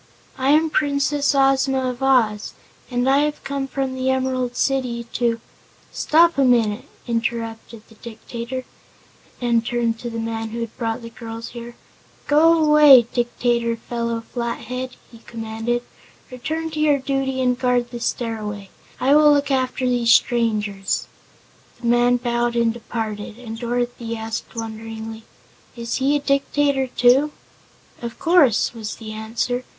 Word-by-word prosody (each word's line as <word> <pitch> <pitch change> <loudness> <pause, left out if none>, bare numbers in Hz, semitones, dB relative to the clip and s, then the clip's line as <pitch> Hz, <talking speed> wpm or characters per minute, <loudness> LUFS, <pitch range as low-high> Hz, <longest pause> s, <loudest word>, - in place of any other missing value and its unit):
"I 265 +1 0
am 310 +2 +4
Princess 285 -1 +1
Ozma 270 -1 +2
of 245 +1 -11
Oz, 230 -6 +2 0.4
and 245 0 0
I 270 +1 +4
have 300 0 -1
come 275 0 -3
from 270 0 -2
the 260 0 -1
Emerald 260 -1 -1
City 250 -3 0
to 235 -1 0 0.2
" - - -31
"Stop 335 0 +3
a - - +5
minute," 230 -4 +2 0.2
interrupted 230 -1 -3
the - - -18
Dictator, 235 +3 -7 0.7
and 235 -2 +1
turned 235 -1 -1
to 240 - -5
the 230 - -6
man 225 0 -3
who 235 +1 -5
had 230 -1 -5
brought 230 -1 -3
the 230 - -8
girls 230 0 -8
there. 240 0 -8 0.5
"Go 310 +3 +5
away, 300 -4 +8
Dictator 240 -1 0
Felo 235 0 -3
Flathead!" 245 +2 -4 0.2
he 230 - -14
commanded. 225 +1 -3 0.5
"Return 315 +6 -4
to 310 - -5
your 300 -2 +4
duty 265 -1 -2
and 250 -1 +1
guard 245 -1 +1
the 240 - -6
Stairway. 210 -4 -4 0.3
I 270 +2 +3
will 300 0 +7
look 285 -1 +2
after 260 -1 0
these 240 -2 +1
strangers." 210 -6 +1 0.7
The 240 - -9
man 240 +1 +4
bowed 240 0 -1
and 230 -1 +2
departed, 220 -2 -5
and 225 -2 -8
Dorothy 240 -1 -2
asked 220 +1 -5
wonderingly: 225 0 -7 0.5
"Is 235 -1 -3
he 275 +2 +2
a - - +2
Dictator, 275 -1 +1
too?" 255 +4 +3 0.7
"Of 235 -1 -6
course," 310 - +3
was 220 -2 -6
the 220 -2 -8
answer. 230 +3 -2
240 Hz, 145 wpm, -21 LUFS, 230-265 Hz, 0.7 s, away